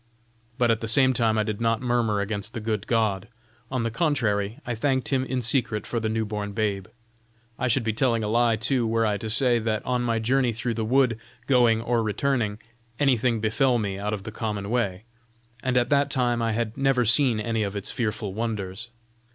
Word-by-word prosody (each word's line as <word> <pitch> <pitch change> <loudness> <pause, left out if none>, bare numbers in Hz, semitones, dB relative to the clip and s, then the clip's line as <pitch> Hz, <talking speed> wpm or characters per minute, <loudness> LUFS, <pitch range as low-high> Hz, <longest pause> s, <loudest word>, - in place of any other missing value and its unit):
But 120 -3 +3
at 110 - +1
the 115 - -3
same 130 +4 +4
time 115 -2 +1
I 110 - +2
did 105 0 -4
not 115 -1 +1
murmur 120 -4 0
against 105 +2 -4
the - - -2
good 110 -2 -3
God; 110 -4 0 0.4
on 130 -3 -1
the 115 - -1
contrary, 115 -7 0
I 120 - -2
thanked 130 +3 0
him 135 -2 +1
in 130 -1 -2
secret 115 -3 0
for 120 - -2
the 110 -1 -2
new 110 0 -1
born 105 -1 -4
babe; 100 -3 -1 0.7
I 130 - 0
should 125 +1 +2
be 110 -1 -1
telling 115 0 +1
a - - -1
lie, 115 +1 +3
too, 120 +1 0
were 115 0 +1
I 105 -1 +1
to 110 +2 -5
say, 120 +2 +3
that 110 -1 -2
on 125 -1 0
my 115 -2 0
journey 125 +2 +1
through 115 +2 -2
the 115 - -2
wood, 125 -1 +2 0.3
going 120 -4 +4
or 120 0 +1
returning, 110 -1 0 0.4
anything 125 -5 +2
befell 120 +4 +2
me 100 -3 -3
out 105 +1 -2
of 105 -2 -4
the 110 - -6
common 105 -2 -4
way, 105 -6 -1 0.6
and 130 -1 0
at 120 - +2
that 140 0 +3
time 120 -3 0
I 115 -1 0
had 115 0 -2
never 135 -3 +2
seen 120 0 +3
any 115 +1 -1
of 100 -1 -2
its 100 0 -3
fearful 105 -5 -3
wonders. 110 0 -4
115 Hz, 210 wpm, -25 LUFS, 105-125 Hz, 0.7 s, same